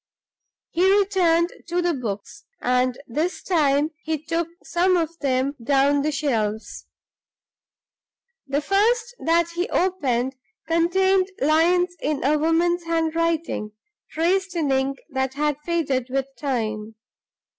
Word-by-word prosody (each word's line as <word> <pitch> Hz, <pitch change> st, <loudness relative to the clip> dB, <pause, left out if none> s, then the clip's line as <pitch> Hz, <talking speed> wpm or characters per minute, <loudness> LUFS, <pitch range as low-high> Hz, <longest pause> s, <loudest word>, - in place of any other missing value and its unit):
He 370 Hz, +3 st, +3 dB
returned 355 Hz, -4 st, +2 dB
to 345 Hz, +1 st, -1 dB
the 350 Hz, -1 st, +1 dB
books, 230 Hz, 0 st, -6 dB
and 250 Hz, 0 st, +1 dB
this 310 Hz, +9 st, -2 dB
time 300 Hz, -3 st, +2 dB
he 315 Hz, 0 st, -2 dB
took 330 Hz, +2 st, -2 dB, 0.2 s
some 360 Hz, +1 st, +2 dB
of 335 Hz, -1 st, -1 dB
them 270 Hz, 0 st, 0 dB
down 280 Hz, +2 st, +3 dB
from -, -, +1 dB
the 305 Hz, +2 st, 0 dB
shelves. 225 Hz, -7 st, -2 dB, 1.6 s
The 280 Hz, +2 st, 0 dB
first 455 Hz, +7 st, +1 dB
that 335 Hz, +1 st, +2 dB
he 350 Hz, +2 st, -2 dB
opened 265 Hz, -9 st, 0 dB, 0.3 s
contained 370 Hz, +3 st, +3 dB
lines 350 Hz, +5 st, +3 dB
in 295 Hz, -1 st, -1 dB
a 295 Hz, +3 st, +2 dB
woman's 340 Hz, +2 st, +1 dB
handwriting, 330 Hz, -8 st, -1 dB, 0.4 s
traced 370 Hz, +3 st, 0 dB
in 305 Hz, -5 st, 0 dB
ink 270 Hz, +1 st, 0 dB
that 265 Hz, 0 st, -1 dB
had 295 Hz, -1 st, 0 dB
faded 280 Hz, -7 st, -1 dB
with 270 Hz, 0 st, 0 dB
time. 220 Hz, -5 st, -3 dB
315 Hz, 125 wpm, -23 LUFS, 270-345 Hz, 1.6 s, He